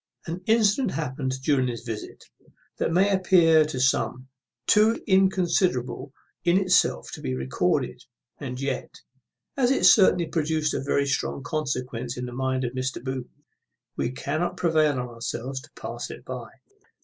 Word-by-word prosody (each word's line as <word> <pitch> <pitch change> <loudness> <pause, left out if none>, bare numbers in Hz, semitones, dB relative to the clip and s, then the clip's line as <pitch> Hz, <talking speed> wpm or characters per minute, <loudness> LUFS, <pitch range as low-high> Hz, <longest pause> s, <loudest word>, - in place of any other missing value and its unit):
An 170 +2 -5
incident 220 +2 +3
happened 130 -3 -2
during 135 -3 +2
this 120 -2 -5
visit, 115 -3 -7 0.6
that - - 0
may 195 +4 +3
appear 175 -4 +5
to 150 -4 -4
some 130 0 0 0.4
too 215 - +4
inconsiderable 175 - +1 0.3
in 175 +1 +4
itself 185 -2 +2
to - - -7
be 65 0 -2
recorded; 65 0 -1 0.4
and 125 -3 -5
yet, 135 -2 -3 0.7
as 255 -3 +2
it 270 - +2
certainly 185 -4 +6
produced 155 -1 0
a - - -1
very 140 +1 +1
strong 135 0 -2
consequence 125 -5 -3
in 125 - -3
the 125 - -7
mind 130 0 -1
of 120 0 -3
Mr. 130 +1 -3
Booth, 130 -2 -4 0.7
we - - -1
cannot 155 +6 -2
prevail 155 -3 +3
on 125 -2 -3
ourselves 120 +2 -5
to 155 - -16
pass - - -5
it - - -10
by. - - -6
140 Hz, 150 wpm, -25 LUFS, 130-175 Hz, 0.7 s, certainly